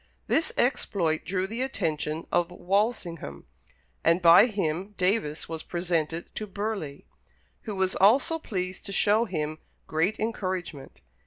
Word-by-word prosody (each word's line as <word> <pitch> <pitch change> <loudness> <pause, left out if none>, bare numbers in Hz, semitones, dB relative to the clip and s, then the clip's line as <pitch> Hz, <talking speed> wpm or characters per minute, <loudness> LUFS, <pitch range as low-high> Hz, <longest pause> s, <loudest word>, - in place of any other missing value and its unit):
This 320 - +1
exploit 175 -10 +1
drew 185 0 -1
the 225 +5 -4
attention 160 - -2
of 175 - +2
Walsingham, 180 - -2 0.6
and 170 +2 +4
by 175 +5 +8
him 195 -1 -2
Davis 180 -5 0
was 160 -1 -5
presented 170 -2 -2
to 215 - -4
Burleigh, 200 -8 -4 0.6
"who 215 -3 -4
was 190 -1 0
also 260 - +4
pleased 185 -8 -4
to - - -5
show 210 +4 +3
him 155 -5 -3 0.3
great 165 +7 0
encouragement." 185 -9 -4
185 Hz, 130 wpm, -27 LUFS, 165-210 Hz, 0.6 s, by